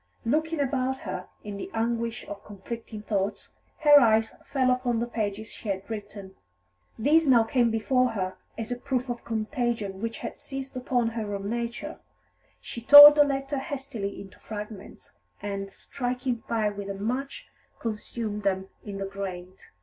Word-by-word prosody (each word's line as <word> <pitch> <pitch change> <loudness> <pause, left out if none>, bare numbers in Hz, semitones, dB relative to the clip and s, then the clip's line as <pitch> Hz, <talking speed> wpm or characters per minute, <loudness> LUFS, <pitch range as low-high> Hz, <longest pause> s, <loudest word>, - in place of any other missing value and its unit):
Looking 315 +6 0
about 265 -1 0
her 185 -2 -5 0.2
in 205 -1 -6
the - - -6
anguish 230 0 -1
of 205 0 -8
conflicting 210 +1 -8
thoughts, 200 -1 -2 0.3
her 295 -1 +9
eyes 220 -3 +3 0.2
fell 260 -2 +3
upon 250 -2 0
the 235 - 0
pages 220 -2 -3
she 215 - -7
had 190 0 -3
written. 205 -3 -7 0.6
These 300 +7 +4
now 240 -4 +6
came 235 +1 +2
before 250 +2 +1
her 185 -3 -2 0.2
as 225 +1 -5
a 245 - -1
proof 255 -1 -2
of 240 - -6
contagion 225 -3 -2
which 230 0 -3
had - - -7
seized 270 -1 -6
upon 250 -2 0
her 220 -3 -4
own 200 +1 -4
nature; 235 0 -4 0.6
she 235 - -8
tore 290 +4 +12
the 295 0 +5
letter 275 0 -2
hastily 265 -8 -5
into 195 -1 -12
fragments, 210 -2 -8 0.3
and, 200 -1 -4
striking 250 0 -3
fire 215 -3 +1
with 200 0 -6
a 200 - -3
match, 250 +7 -3 0.3
consumed 215 -1 -4
them 190 -1 -1
in 200 -2 -6
the 195 - -3
grate. 190 -2 -7
230 Hz, 160 wpm, -27 LUFS, 205-255 Hz, 0.6 s, tore